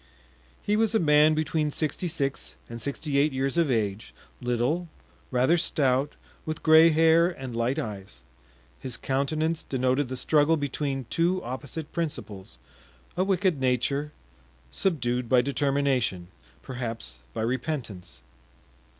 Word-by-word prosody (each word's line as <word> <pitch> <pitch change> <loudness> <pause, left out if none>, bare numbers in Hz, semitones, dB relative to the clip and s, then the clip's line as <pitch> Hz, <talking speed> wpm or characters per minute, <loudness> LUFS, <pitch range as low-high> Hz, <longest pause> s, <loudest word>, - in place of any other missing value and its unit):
He 205 - +1
was 220 0 +2
a - - +4
man 150 -1 +5
between 155 0 0
sixty 155 +4 -2
six 140 -5 -3
and 115 0 -8
sixty 140 +2 -1
eight 150 +2 +3
years 135 +2 0
of 170 -3 +2
age, 110 -3 -2 0.3
little, 125 +8 -1 0.4
rather 130 +7 +3
stout, 140 -4 +1 0.3
with 155 -1 -5
gray 160 +1 +7
hair 165 +1 +5
and 130 -8 -7
light 120 +4 0
eyes. 100 - -6 0.6
His 130 -2 -5
countenance 155 +4 -1
denoted 130 +1 0
the 130 +1 -5
struggle 155 +4 +3
between 140 -2 -3
two 175 +3 +1
opposite 140 +5 -6
principles—a 95 - -6
wicked 190 -5 +1
nature, 140 +3 0 0.6
subdued 125 -9 -1
by 125 -2 +5
determination, 135 -9 0 0.3
perhaps 115 - -5 0.2
by - - -1
repentance. 120 - -4
140 Hz, 125 wpm, -26 LUFS, 125-160 Hz, 0.6 s, gray